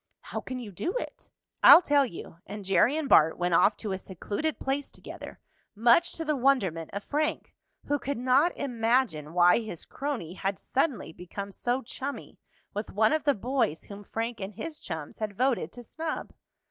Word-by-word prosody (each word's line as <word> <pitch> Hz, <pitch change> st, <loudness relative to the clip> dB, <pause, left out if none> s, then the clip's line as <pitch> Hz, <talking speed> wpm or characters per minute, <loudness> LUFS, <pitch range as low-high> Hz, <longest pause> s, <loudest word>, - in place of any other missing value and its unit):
"How -, -, -5 dB
can 255 Hz, -, -6 dB
you 235 Hz, -5 st, -7 dB
do 340 Hz, -, -3 dB
it?" -, -, -7 dB, 0.3 s
"I'll 355 Hz, -, +10 dB
tell 285 Hz, -3 st, +3 dB
you," 165 Hz, -4 st, -10 dB
and 205 Hz, -1 st, -7 dB
Jerry 215 Hz, +9 st, +3 dB
and 315 Hz, -3 st, -2 dB
Bart 160 Hz, -, +5 dB
went 175 Hz, 0 st, 0 dB
off 205 Hz, +5 st, +4 dB
to 210 Hz, -, -4 dB
a 190 Hz, -, -2 dB
secluded 205 Hz, -, -3 dB
place 275 Hz, +1 st, -2 dB
together, -, -, -10 dB, 0.4 s
much 240 Hz, +11 st, +4 dB
to 325 Hz, -, -4 dB
the 305 Hz, -1 st, +1 dB
wonderment 215 Hz, -, +1 dB
of 200 Hz, +1 st, -5 dB
Frank, 305 Hz, +2 st, -2 dB, 0.3 s
who 290 Hz, 0 st, 0 dB
could 280 Hz, +2 st, -3 dB
not 260 Hz, +7 st, +3 dB
imagine 230 Hz, -, 0 dB
why 175 Hz, +3 st, +5 dB
his 215 Hz, -8 st, -7 dB
crony 260 Hz, -, -4 dB
had 195 Hz, +1 st, -2 dB
suddenly 265 Hz, -, -1 dB
become 200 Hz, +4 st, -7 dB
so 245 Hz, +6 st, -1 dB
chummy 275 Hz, +4 st, -7 dB, 0.3 s
with 210 Hz, +1 st, -4 dB
one 215 Hz, +4 st, +3 dB
of 310 Hz, -, 0 dB
the 285 Hz, -, +4 dB
boys 230 Hz, -, -1 dB
whom 205 Hz, 0 st, -10 dB
Frank 230 Hz, +3 st, -4 dB
and 195 Hz, +1 st, -6 dB
his 320 Hz, +5 st, -6 dB
chums 160 Hz, -5 st, -7 dB
had 210 Hz, -2 st, -4 dB
voted 250 Hz, -9 st, +1 dB
to 245 Hz, -, -9 dB
snub. 315 Hz, +7 st, -5 dB
235 Hz, 185 wpm, -28 LUFS, 195-280 Hz, 0.4 s, I'll